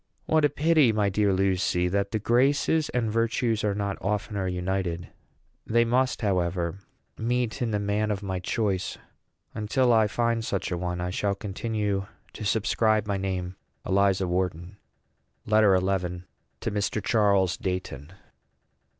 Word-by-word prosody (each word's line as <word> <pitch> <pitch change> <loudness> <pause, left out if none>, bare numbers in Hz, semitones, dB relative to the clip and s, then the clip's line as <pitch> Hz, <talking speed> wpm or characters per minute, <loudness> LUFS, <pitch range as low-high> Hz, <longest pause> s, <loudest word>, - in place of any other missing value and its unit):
What 155 -1 +2
a 145 - +5
pity, 155 -5 +3
my 105 -2 +1
dear 100 +1 +2
Lucy, 95 -2 +1
that 100 +2 0
the 110 - -1
graces 135 +7 +2
and 115 -3 -1
virtues 115 0 0
are 105 -2 +1
not 100 -1 -3
oftener 100 -1 -2
united! 90 -1 -2 0.6
They 115 +1 +3
must, 125 +1 +1
however, 90 -2 0 0.4
meet 120 +2 -1
in 120 - 0
the 105 - 0
man 105 +1 0
of 105 -1 -2
my 95 -2 -3
choice; 95 -1 -1 0.6
and 105 -2 -5
till 125 -1 +3
I 110 -2 +4
find 115 +1 0
such 100 -3 -2
a - - 0
one, 90 0 -3
I 90 0 -2
shall 100 +1 0
continue 100 -1 -2 0.3
to - - -7
subscribe 110 +1 +2
my 100 -1 -1
name 95 -1 -3 0.3
ELIZA 95 -1 +2
WHARTON. 90 +1 -2 0.7
LETTER 105 -3 +5
XI. 90 -2 -2 0.4
TO - - -2
MR. 105 +1 -1
CHARLES 100 -4 +2
DEIGHTON. 90 -5 -4
100 Hz, 150 wpm, -26 LUFS, 95-110 Hz, 0.7 s, a